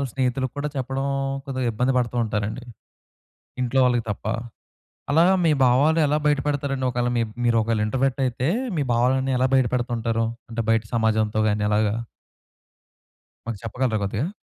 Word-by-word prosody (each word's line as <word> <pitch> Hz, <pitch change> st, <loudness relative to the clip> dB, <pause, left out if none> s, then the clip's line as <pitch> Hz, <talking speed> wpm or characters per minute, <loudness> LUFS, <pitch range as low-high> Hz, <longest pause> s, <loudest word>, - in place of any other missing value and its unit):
వాళ్ళ -, -, 0 dB
స్నేహితులకి 130 Hz, -1 st, -1 dB
కూడా 150 Hz, -, -1 dB
చెప్పడం 135 Hz, +1 st, -2 dB, 0.4 s
కొద్దిగ 130 Hz, -2 st, -3 dB
ఇబ్బంది 125 Hz, +4 st, +1 dB
పడుతూ 120 Hz, 0 st, -1 dB
ఉంటారండి. 110 Hz, +3 st, -3 dB, 1.0 s
ఇంట్లో 125 Hz, +2 st, +1 dB
వాళ్ళకి 120 Hz, -2 st, +1 dB
తప్ప. 100 Hz, -, -8 dB, 0.9 s
అలా 160 Hz, +3 st, +5 dB, 0.2 s
మీ 160 Hz, -, +4 dB
భావాలు 145 Hz, +6 st, +4 dB
ఎలా 150 Hz, +1 st, +2 dB
బయటపెడతారండి 140 Hz, -2 st, 0 dB
ఒకవేళ 120 Hz, 0 st, 0 dB
మి -, -, +2 dB, 0.2 s
మీరు 120 Hz, -1 st, +3 dB
ఒకవేళ 110 Hz, -1 st, 0 dB
ఇంట్రోవర్ట్ 135 Hz, +3 st, 0 dB
అయితే 125 Hz, +1 st, -1 dB, 0.3 s
మీ 145 Hz, -, +1 dB
భావాలన్నీ 130 Hz, +3 st, +2 dB
ఎలా 130 Hz, -, +3 dB
బయటపెడుతుంటారు? 120 Hz, -2 st, 0 dB, 0.3 s
అంటే 115 Hz, -, -2 dB
బయట 115 Hz, -1 st, +2 dB
సమాజంతో 110 Hz, -1 st, +1 dB
గాని 105 Hz, 0 st, 0 dB
అలాగా? 105 Hz, 0 st, +2 dB, 1.5 s
మాకు 115 Hz, -4 st, -4 dB
చెప్పగలరా 115 Hz, 0 st, -1 dB
కొద్దిగా? 105 Hz, -, -2 dB
125 Hz, 140 wpm, -23 LUFS, 115-135 Hz, 1.5 s, అలా